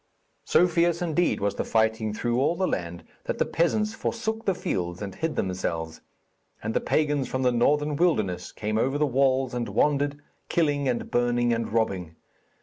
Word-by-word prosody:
So 180 - +4
fierce, 170 -1 +2
indeed, 175 +1 +1
was 100 0 0
the - - -2
fighting 110 -1 +1
through 120 +3 -1
all 160 +5 +2
that 190 +2 0
land, 85 - -3 0.2
that - - -2
the - - +2
peasants 210 +6 +1
forsook 225 0 -3
the 195 - +2
fields 90 - -3
and 100 -2 -5
hid 160 - -3
themselves; 85 -3 -3 0.6
and 110 +1 -2
the - - +1
pagans 145 -3 +1
from 130 0 -2
the 125 - +4
northern 145 +5 +2
wilderness 105 - 0
came 110 0 -2
over 135 +4 +1
the 150 - +2
walls 130 -1 +2
and 120 -3 -2
wandered, 145 +6 +1 0.3
killing 145 -4 +1
and 120 - -2
burning 120 0 +2
and 115 -1 -2
robbing. 95 -7 -1
125 Hz, 175 wpm, -26 LUFS, 105-150 Hz, 0.6 s, So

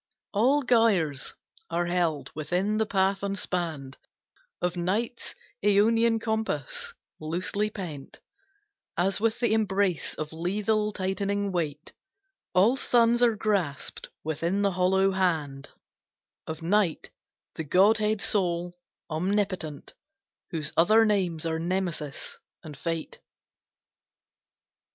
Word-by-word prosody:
All 260 +8 +3
gyres 200 - +2 0.3
are 170 +1 0
held 170 -4 0
within 180 +7 -1
the 220 0 +1
path 195 -1 +1
unspanned 175 -8 -3 0.6
Of 180 0 -1
Night's 205 +7 -2 0.3
aeonian 225 +3 +4
compass 470 - -2 0.2
loosely 185 +6 -1
pent 170 -10 -8 0.8
As 190 +4 +1
with 225 +1 +1
the 235 -3 +2
embrace 200 -5 +1
of 155 0 -5
lethal 210 +5 0
tightening 200 +1 -1
weight; 155 -5 -3 0.6
All 205 +8 +5
suns 240 -1 +3
are 235 -2 +4
grasped 195 -10 -2
within 170 +6 -1
the 200 - +3
hollow 190 +2 +3
hand 160 -7 -1 0.8
Of 160 0 -6
Night, 185 -1 +1 0.4
the 160 - -4
godhead 210 +6 +3
sole, 175 -3 0 0.3
omnipotent, 180 -2 -2 0.6
Whose 160 -3 -3
other 215 +7 +5
names 180 -6 0
are 160 0 -1
Nemesis 170 -4 -3 0.2
and 155 -3 -9
Fate. 165 +2 -4
190 Hz, 105 wpm, -27 LUFS, 165-210 Hz, 0.8 s, All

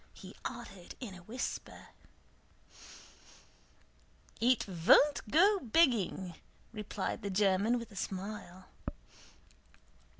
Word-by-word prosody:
he - - -11
added 185 -3 -7
in 235 -7 -6
a 180 - -11
whisper. 230 +8 -5 2.5
"It 250 +1 +3
von't 205 - +5
go 390 - +5
begging," 225 - +2 0.4
replied 210 -2 -4
the 200 - -3
German 200 +4 +3
with 230 -1 -7
a - - -13
smile. 190 -1 -5
210 Hz, 90 wpm, -33 LUFS, 190-245 Hz, 2.5 s, von't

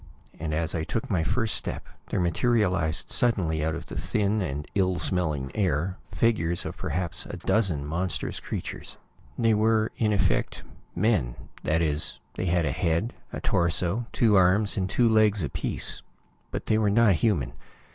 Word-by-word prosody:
And 80 0 -3
as 80 +1 -1
I 80 - -1
took 110 +8 -3
my 90 -5 +1
first 115 +4 0
step, - - -3 0.2
there - - -1
materialized 90 -3 +1
suddenly 85 -10 +2
out 80 0 0
of 80 -1 -7
the - - -9
thin 105 0 0
and 75 -4 -3
ill 95 -2 +1
smelling 75 -9 +1
air, 90 -2 0
the - - -13
figures 85 -7 +1
of - - -5
perhaps 85 -2 -2
a - - -6
dozen 90 -10 +1
monstrous 90 +5 -3
creatures. - - -6 0.4
They 115 -2 +3
were, 110 +1 +2
in 110 -2 +1
effect, 100 - 0 0.3
men. 85 - +1 0.3
That 80 +2 +1
is, 75 0 +1 0.2
they 90 - -3
had 85 -1 +2
a 70 - 0
head, 85 - 0 0.2
a - - -5
torso, 90 +6 +1
two 110 -3 +3
arms 95 +3 +3
and 95 -2 -1
two 120 +5 +3
legs 110 -4 +3
apiece. 70 - -2 0.5
But - - -5
they 110 - +2
were 105 -2 +2
not 110 0 +5
human. 85 - 0
90 Hz, 165 wpm, -26 LUFS, 80-110 Hz, 0.5 s, not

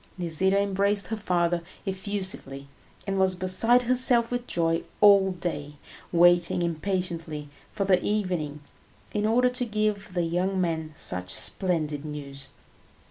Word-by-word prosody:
Nisida 180 +3 +1
embraced 200 +1 +1
her 225 - -2
father 175 -4 0 0.2
effusively, 190 -8 -4 0.4
and 195 -1 -2
was 190 -1 +2
beside 190 +7 +4
herself 245 -1 +4
with 245 0 -3
joy 165 -1 0 0.2
all 200 -2 +6
day, 155 -5 -5 0.4
waiting 175 0 +3
impatiently 170 -3 -3 0.2
for 200 - -2
the 185 -2 +2
evening 180 -8 -2 0.5
in 210 0 0
order 250 +3 +3
to 250 0 0
give 210 -4 -2
the 175 - +1
young 180 +3 -1
man 160 -3 -2
such 90 -7 -3
splendid 155 - -1
news. 140 -2 -7
185 Hz, 130 wpm, -26 LUFS, 165-205 Hz, 0.5 s, all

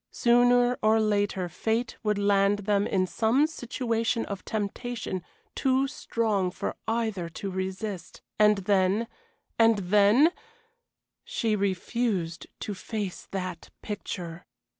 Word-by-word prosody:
Sooner 245 +1 +4
or 220 +1 +4
later 205 -3 +1
fate 225 +6 -1
would 210 -2 0
land 200 0 +2
them 205 -1 +2
in 185 -1 +1
some 225 - +2
situation 235 -5 -1
of 200 -1 -6
temptation 220 -1 -3 0.3
too 265 +1 +2
strong 220 -8 -1
for - - -4
either 220 -6 -1
to 195 +4 -5
resist 190 0 -5 0.2
and 210 -1 +6
then 200 +3 +2 0.5
and 225 -1 +6
then 205 - +5 0.9
She 225 -3 -1
refused 195 -3 -1
to 210 - -3
face 200 -1 -5
that 185 -3 -5
picture. 175 -4 -6
210 Hz, 115 wpm, -27 LUFS, 190-230 Hz, 0.9 s, and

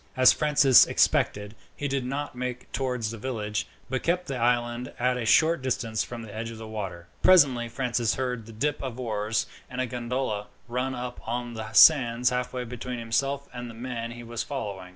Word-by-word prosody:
As 130 0 +7
Francis 145 -4 +6
had - - -7
expected, 105 +1 +2 0.2
he 145 - -3
did 135 -1 -1
not 140 +3 -3
make 125 0 -5
towards 125 -5 -2
the 115 - -7
village, 105 -3 -3 0.2
but 130 -1 -2
kept 180 -2 -1
along 130 -3 -3
the - - +2
island 120 0 0
at 125 +1 +1
a 115 -2 -3
short 160 +4 +4
distance 115 -4 -1
from 120 -1 -7
the 105 -2 -10
edge 115 +1 -4
of 115 - -8
the 110 0 -8
water. 95 -6 -6 0.2
Presently 135 -10 +5
Francis 120 -3 0
heard 125 -4 -3
the - - -9
dip 145 +7 -1
of 130 -2 -5
oars, 110 -2 -1 0.2
and 125 - -6
a 130 - +1
gondola 120 -3 -3 0.2
ran 125 +2 -2
up 125 0 -5
on 120 +1 -3
the 110 -1 -6
sands 125 -1 +6
halfway 125 0 -2
between 125 +1 -6
himself 135 +5 -1
and 120 -1 -6
the 115 - -10
man 115 -1 -4
he 120 0 -9
was 115 0 -4
following. 100 -10 -5
120 Hz, 200 wpm, -27 LUFS, 115-130 Hz, 0.2 s, As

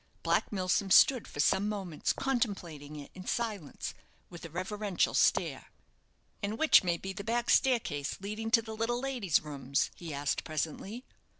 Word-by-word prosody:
Black - - +1
Milsom 195 0 0
stood 250 +5 +6
for - - -10
some 190 +7 +3
moments 190 -7 -2
contemplating 180 - -2
it 145 -1 -9
in 185 0 -10
silence, 215 - -3 0.4
with 175 - -10
a 165 - -7
reverential 190 +3 -1
stare. - - +2 0.7
"And 205 +1 -2
which 315 -6 +6
may 175 -2 +1
be 190 +2 -6
the 200 - -6
back 235 +2 0
staircase, 220 - +2
leading 215 +3 -4
to 230 0 +4
the 220 0 -7
little 230 +2 -1
lady's 245 - +1
rooms?" 140 -2 -1
he 170 -2 -8
asked, 145 0 -1
presently. 165 - -4
195 Hz, 160 wpm, -31 LUFS, 160-225 Hz, 0.7 s, stood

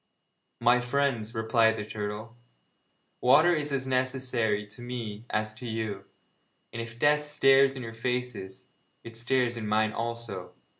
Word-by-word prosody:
'My 120 +1 +5
friends,' 125 -3 0
replied 110 0 +3
the 105 - -4
turtle, 105 +2 -5 0.9
'water 155 +8 +6
is 150 -1 -1
as 135 -1 -1
necessary 130 -5 0
to 105 +3 -12
me 120 -2 -6
as 110 0 -1
to 120 +3 -8
you, 110 -3 -3 0.7
and 115 - -3
if 115 0 -8
death 150 +3 +3
stares 135 -2 +4
in 130 - -6
your 115 -1 -7
faces, 120 -5 -4 0.4
it 115 -1 -10
stares 120 0 +1
in 110 -2 -4
mine 110 +1 +2
also. 115 -5 -5
115 Hz, 145 wpm, -28 LUFS, 110-130 Hz, 0.9 s, water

